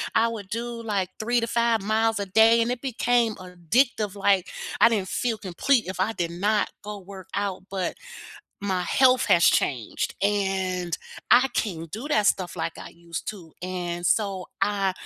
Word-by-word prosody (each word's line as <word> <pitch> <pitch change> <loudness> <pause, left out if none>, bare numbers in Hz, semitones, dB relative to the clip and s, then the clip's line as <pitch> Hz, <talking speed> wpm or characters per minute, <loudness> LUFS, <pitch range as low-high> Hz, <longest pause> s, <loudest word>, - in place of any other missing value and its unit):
I 230 - +4
would 210 -4 -6
do, 235 +1 -4
like, 200 -5 -1
3 240 +2 +1
to 230 - -1
5 235 -2 +2
miles 220 +1 +1
a 200 - -2
day 225 +4 +5
and 235 - 0
it 250 -1 -3
became 240 -3 +1
addictive, 190 - 0
like, 195 -2 +2 0.3
I - - +9
didn't 200 -5 -1
feel 235 -3 -1
complete 220 +6 +1
if 185 -1 -5
I 215 +4 +1
did 170 -4 -2
not 205 +4 +1
go 210 0 -6
work 190 0 -11
out 200 -2 -2
but, 190 -3 -2 0.7
my 185 -2 0
health 255 +6 +4
has 170 - +4
changed 125 -6 +1
and 190 -3 0 0.4
I 255 +2 +6
can't 165 -6 -3
do 225 - -6
that 215 -9 +3
stuff, 180 -2 0
like, 165 - -4
I - - -9
used 170 -1 -8
to 175 -7 -12
and 175 -1 -3
so 195 -3 +1
I 195 -1 +1
200 Hz, 175 wpm, -25 LUFS, 185-225 Hz, 0.7 s, I